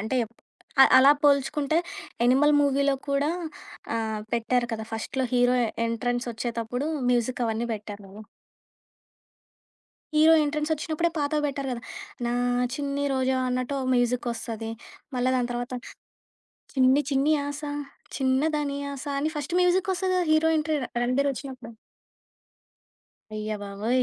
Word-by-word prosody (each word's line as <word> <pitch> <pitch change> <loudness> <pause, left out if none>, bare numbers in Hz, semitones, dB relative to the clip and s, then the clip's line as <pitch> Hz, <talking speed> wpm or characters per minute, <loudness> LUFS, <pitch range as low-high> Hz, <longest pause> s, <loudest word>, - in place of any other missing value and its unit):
అంటే 220 +5 -1 0.6
అ - - +11
అలా 275 +2 +8
పోల్చుకుంటే 290 +2 +2 0.4
'యానిమల్' 270 +5 +5
మూవీలో 280 0 +2
కూడా 280 +2 +1 0.7
ఆహ్, 220 -1 -2
పెట్టారు 240 +1 +1
కదా! 220 -1 -3
ఫస్ట్‌లో 255 +4 -2
హీరో 245 0 +4 0.3
ఎంట్రన్సొచ్చేటప్పుడు 240 +1 -2 0.2
మ్యూజికవన్నీ 235 -1 0
పెట్టారు 210 -1 -8
గదా! 200 +3 -11 1.9
హీరో 315 +1 +7
ఎంట్రన్సొచ్చినప్పుడే 305 +2 -1
పాతవి 295 +1 0
పెట్టారు 275 -1 -3
గదా! 240 - -4 0.4
'నా 235 - 0 0.4
చిన్ని 285 0 -2
రోజావె' 260 0 +1
అన్నట్టు 255 +2 -1 0.2
మ్యూజికొస్తది, 235 -2 -1 0.5
మళ్ళా 250 +1 +2
దాని 245 -1 0
తరువాత, 245 +1 -4 1.0
చిన్ని 265 +2 +4
చిన్ని 275 +3 +3
ఆశ 285 +1 -5 0.6
చిన్న 265 0 +2
దాని 285 -1 -2 0.2
ఆశ 275 +1 -8
అని 305 +2 0
ఫస్ట్ 295 +3 -4
మ్యూజిక్కొస్తది 370 +1 +1
గదా! 360 - +1
హీరో 315 +1 +4
ఎంట్రీ 305 0 0 0.2
'రణబీర్' 255 +4 +2
ఒచ్చినప్పుడు. 255 -3 -8 1.6
అయ్య 215 0 -3
బాబోయ్! 210 +6 0
260 Hz, 110 wpm, -26 LUFS, 240-290 Hz, 1.9 s, అ